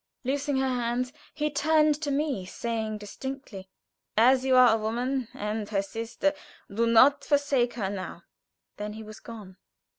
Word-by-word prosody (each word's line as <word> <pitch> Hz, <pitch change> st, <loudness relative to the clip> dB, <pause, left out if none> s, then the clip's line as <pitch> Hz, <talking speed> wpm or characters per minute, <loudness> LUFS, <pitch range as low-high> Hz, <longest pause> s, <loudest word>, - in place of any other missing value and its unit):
Loosing 280 Hz, +2 st, -1 dB
her 265 Hz, 0 st, +1 dB
hands 250 Hz, 0 st, -1 dB, 0.2 s
he 300 Hz, 0 st, -1 dB
turned 305 Hz, +1 st, +3 dB
to 300 Hz, -, -2 dB
me, 280 Hz, -7 st, -1 dB
saying 220 Hz, +2 st, -3 dB
distinctly: 210 Hz, -2 st, -7 dB, 0.5 s
"As 255 Hz, +3 st, +5 dB
you 265 Hz, -1 st, +3 dB
are 250 Hz, -3 st, +7 dB
a -, -, +2 dB
woman, 245 Hz, +3 st, -1 dB
and 210 Hz, 0 st, -3 dB
her 200 Hz, -2 st, 0 dB
sister, 230 Hz, +7 st, -2 dB, 0.4 s
do 230 Hz, +3 st, +1 dB
not 270 Hz, +5 st, +6 dB
forsake 280 Hz, -5 st, +1 dB
her 210 Hz, -5 st, -2 dB
now." 190 Hz, -2 st, -6 dB, 0.5 s
Then 210 Hz, 0 st, -5 dB
he 220 Hz, +1 st, -8 dB
was 215 Hz, 0 st, -11 dB
gone. 210 Hz, -5 st, -11 dB
240 Hz, 155 wpm, -27 LUFS, 215-275 Hz, 0.5 s, are